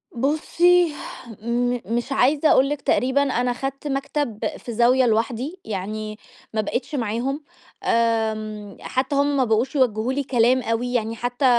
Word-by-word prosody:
بُصّي، 325 +6 +3 0.5
م 245 +2 0
مش 240 +4 -2
عايزة 285 +3 +3
أقول 270 +1 +5
لِك 295 -1 -3
تقريبًا 260 +2 +2
أنا 250 -2 0
خدت 270 +3 -5
مكتب 275 -4 -2 0.2
في 235 - -7
زاوية 245 +3 +4
لوحدي، 240 - -1
يعني 215 +1 -4 0.4
ما 215 - +1
بقيتش 240 +8 -3
معاهم. 250 +5 -2 0.4
آمم 215 -3 0
حتّى 265 +2 -1
هم 285 0 +2
ما 265 - +4
بقوش 230 +4 +1
يوجّهوا 245 -2 +1
لي 280 +1 -1
كلام 250 0 +3
أوي، 240 +1 -1
يعني 225 -2 0
حتّى 245 +3 -2
245 Hz, 145 wpm, -23 LUFS, 225-275 Hz, 0.5 s, أقول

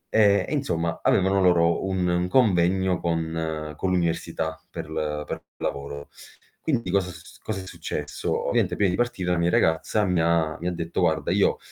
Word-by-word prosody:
Ehm, 100 -3 +5
e - - -3
insomma 85 - -1
avevano 95 +1 +3
loro 85 -2 +3
un 95 -2 0
un 90 0 +1
convegno 95 -5 +3
con 80 -2 -2
con 95 - -1
l'università 80 -2 -1
per 80 -2 -6
l 75 -1 -2
per - - -5
lavoro. 70 +1 -5 0.5
Quindi 115 - -1
cosa 95 -2 +1
s 80 0 -14
cosa 105 -3 -4
è - - -10
successo? 80 -5 -3
Ovviamente - - +1
prima 100 -2 +2
di 90 - -2
partire 120 -7 -1
la 90 - +2
mia 85 +1 +2
ragazza 80 +7 +2
mi 90 -2 +1
ha 80 -1 +1
mi 90 +2 -2
detto: 85 0 -3
"Guarda 80 -2 +1
io, - - +3
85 Hz, 175 wpm, -25 LUFS, 80-95 Hz, 0.5 s, Ehm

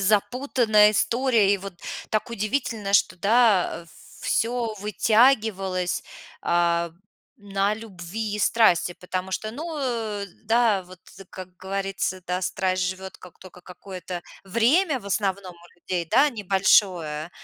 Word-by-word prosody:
запутанная 215 +1 +3
история. 230 -2 +2
И - - +2
вот 195 -1 -8 0.4
так 215 - 0
удивительно, 215 -2 -2
что, 200 - +3
да, 205 -2 +3
а, 170 - -19 0.3
всё 230 -1 -1
вытягивалось, 210 -4 +2 0.4
а, 170 0 +1 0.5
на 200 0 -1
любви 210 0 -6
и - - -6
страсти. 210 -6 +3
Потому 185 +1 -4
что, 215 +3 -3
ну, 315 +7 -6
э, 225 -6 -2 0.2
да, 225 -3 +3
вот, 180 0 -15 0.3
как 185 -1 -10
говорится, 195 0 -3
да, 180 +1 -1
страсть 185 -1 -1
живёт 185 +1 -4
как 180 - -15
только 180 -1 -13
какое-то 180 -1 -8 0.2
время 260 - +2
в 200 - -12
основном 195 -2 -2
у 175 0 -21
людей, 175 -1 -2
да, 290 - +5
небольшое, 185 - +2
200 Hz, 125 wpm, -24 LUFS, 185-225 Hz, 0.5 s, да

